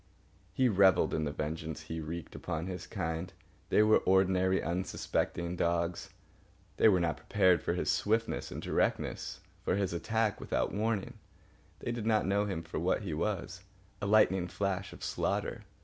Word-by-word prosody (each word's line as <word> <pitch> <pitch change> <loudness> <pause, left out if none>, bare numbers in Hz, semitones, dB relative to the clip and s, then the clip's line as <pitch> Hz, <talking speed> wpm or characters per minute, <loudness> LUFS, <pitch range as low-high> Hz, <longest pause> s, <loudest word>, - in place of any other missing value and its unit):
He 130 - +2
revelled 95 -4 +4
in 80 - 0
the 75 - -2
vengeance 80 +1 -4
he 80 +1 -5
wreaked 85 +2 -6
upon 80 -1 -4
his 90 -1 -6
kind. 85 -2 -3 0.4
They 105 - +5
were 110 0 +5
ordinary, 95 0 +3
unsuspecting 85 0 -2
dogs. 85 0 -1 0.7
They - - +6
were 95 -3 +4
not 85 -2 0
prepared 95 -4 +3
for 85 - -1
his 90 - +1
swiftness 115 +2 0
and - - -6
directness, - - -1 0.2
for - - +1
his 95 -3 0
attack 110 +4 0
without - - -1
warning. 105 -1 -1 0.6
They - - -2
did 115 -2 -3
not 110 -1 +3
know 100 +2 +2
him 95 -5 -3
for 80 -1 -4
what 90 +5 +1
he 90 -6 -3
was, 95 +2 -2 0.4
a 105 - -1
lightning 95 -4 +4
flash 100 0 -2
of - - -11
slaughter. - - -2
95 Hz, 165 wpm, -32 LUFS, 85-100 Hz, 0.7 s, They